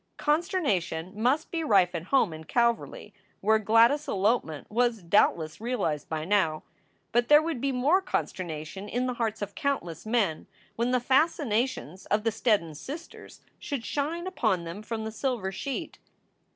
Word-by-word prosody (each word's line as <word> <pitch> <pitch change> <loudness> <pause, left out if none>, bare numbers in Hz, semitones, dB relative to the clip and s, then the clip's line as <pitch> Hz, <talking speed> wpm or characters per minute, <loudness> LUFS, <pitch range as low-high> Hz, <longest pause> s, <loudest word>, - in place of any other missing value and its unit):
Consternation 290 - 0
must 255 +8 +1
be 330 -1 -1
rife 195 - +4
at 170 -1 -4
home 220 -7 +2
in 160 0 -9
Calverly 235 -2 0 0.3
where 220 +2 +3
Gladys 230 +7 +4
s - - -19
elopement 195 - 0
was 235 -2 +1
doubtless 170 -2 +2
realized 225 - -2
by 155 -1 -3
now, 180 -5 +1 0.5
but 240 +1 +2
there 295 0 +8
would 315 -7 -3
be 275 - +1
more 280 +9 +3
consternation 185 - -4
in 245 +2 -1
the 250 - -1
hearts 220 -3 -2
of 205 - -6
countless 275 - -2
men 215 -8 0 0.3
when 235 +2 0
the 250 0 +2
fascinations 250 - 0
of 210 0 +1
the 225 - +1
Steddon 210 -8 +1
sisters 300 - -9 0.2
should 270 -5 -4
shine 295 - -2
upon 220 - 0
them 170 +5 -7
from 220 0 -4
the 220 - -4
silver 225 -4 -2
sheet. 270 +7 -5
225 Hz, 160 wpm, -28 LUFS, 185-265 Hz, 0.5 s, there